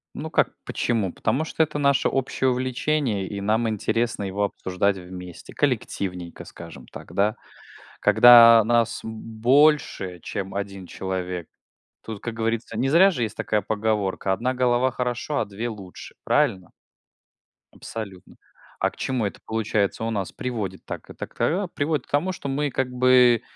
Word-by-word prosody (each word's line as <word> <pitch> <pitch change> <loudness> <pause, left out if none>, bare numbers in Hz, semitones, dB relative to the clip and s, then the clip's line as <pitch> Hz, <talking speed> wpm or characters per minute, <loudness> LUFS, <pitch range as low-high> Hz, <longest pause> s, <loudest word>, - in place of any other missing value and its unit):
Ну - - -5
как - - +1
почему? 110 -6 -1
Потому 150 +5 -1
что 160 - +1
это 155 - -4
наше 140 -2 +3
общее 130 0 0
увлечение 130 -3 -1
и 100 0 -5
нам 110 +3 +1
интересно 110 +1 -1
его 100 +1 -2
обсуждать 95 0 -1
вместе, 90 -1 -10
коллективненько, 90 -3 -2
скажем - - -11
так, - - -11
да. 105 +3 +1 0.6
Когда 115 +1 +8
нас 115 0 +1
больше 115 - +1
чем 100 -2 -5
1 100 -2 -5
человек, 90 -2 -4 0.6
тут, 110 -3 -7
как 120 - -5
говорится- 115 0 -2
не 125 +4 0
зря 180 +7 +6
же 125 - -3
есть 110 - -3
такая 105 -1 0
поговорка: 105 -2 -1
"Одна 125 +6 -1
голова 125 0 +2
хорошо, 125 +3 -2
а - - +1
две 105 +4 -5
лучше". 100 -5 -10
Правильно? 95 -2 +1 1.0
Абсолютно. 100 -5 -8 0.4
А, - - +2
к - - -21
чему 130 -5 -1
это 100 - -5
получается 110 -1 -1
у 115 - -1
нас 100 -5 -3
приводит? 110 -9 -4
Так, - - -7
это - - -7
к - - -27
та 185 +6 +1
а, 190 - -3
приводит 150 -4 -2
к - - -23
тому, 160 +6 +1
что 140 -5 -6
мы 145 +2 0
как 130 -1 -1
бы 125 -2 +5
115 Hz, 160 wpm, -24 LUFS, 100-130 Hz, 1.0 s, Когда